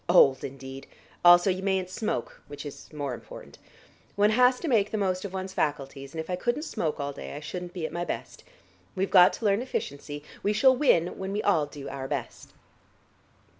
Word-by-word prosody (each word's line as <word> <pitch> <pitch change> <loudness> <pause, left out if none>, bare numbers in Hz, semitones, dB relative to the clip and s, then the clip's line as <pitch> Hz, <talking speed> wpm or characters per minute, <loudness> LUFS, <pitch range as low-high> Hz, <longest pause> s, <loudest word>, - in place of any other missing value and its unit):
Old, 135 -7 +6
indeed! 135 0 -8 0.4
Also 175 +2 +7
you 185 +1 -3
mayn't 190 -1 0
smoke, 185 - -3
which 145 0 -8
is 145 - -9
more 145 -4 -3
important. - - -11 0.6
One 205 +1 +4
has 250 +2 +4
to 340 - -3
make 215 -7 +3
the 215 - -2
most 185 -2 0
of 200 - -5
one's 190 0 -5
faculties, 140 -4 -2
and - - -4
if 160 - -4
I 180 - -1
couldn't 240 +10 -1
smoke 160 - -2
all 140 0 -3
day, - - -8
I - - -5
shouldn't 175 +3 -6
be 175 -4 -3
at - - -5
my 175 - -2
best. - - -6 0.5
We've 190 +1 -1
got 180 -2 +8
to 225 - -6
learn 200 +2 +3
efficiency; 145 - -5 0.2
we 205 - +1
shall 260 +5 +5
win 180 - +2
when 190 0 -4
we 210 - -1
all 160 -7 +3
do 145 -1 -9
our 135 -1 -5
best." - - -5
180 Hz, 205 wpm, -27 LUFS, 145-200 Hz, 0.6 s, got